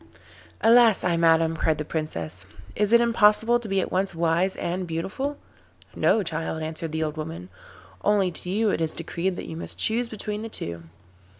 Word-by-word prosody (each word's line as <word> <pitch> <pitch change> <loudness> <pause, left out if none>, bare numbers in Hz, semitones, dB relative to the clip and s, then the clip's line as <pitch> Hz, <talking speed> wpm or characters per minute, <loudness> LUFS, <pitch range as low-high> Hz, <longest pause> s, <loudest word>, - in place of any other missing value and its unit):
'Alas 230 -2 +5
I 175 - +2
madam,' 165 -1 +3
cried 160 -1 +1
the 150 - -4
Princess, 95 - -4 0.3
'is 210 0 0
it 235 - +7
impossible 230 0 +4
to 235 - -7
be 195 0 +1
at - - -4
once 190 0 0
wise 170 +3 +2
and 180 +1 -3
beautiful?' 195 - -3 0.6
'No, 220 - +3
child,' 160 -1 -3
answered 160 +1 -4
the 160 0 -1
old 155 0 -4
woman, 155 - -6 0.5
'only 200 -3 +2
to 180 - -4
you 210 +2 +1
it - - -1
is 160 -1 -1
decreed 180 +2 -2
that - - -6
you 160 - -7
must 165 - -7
choose 235 +2 +1
between 210 -1 -4
the 225 - -6
two. 85 - -5
180 Hz, 185 wpm, -25 LUFS, 160-210 Hz, 0.6 s, it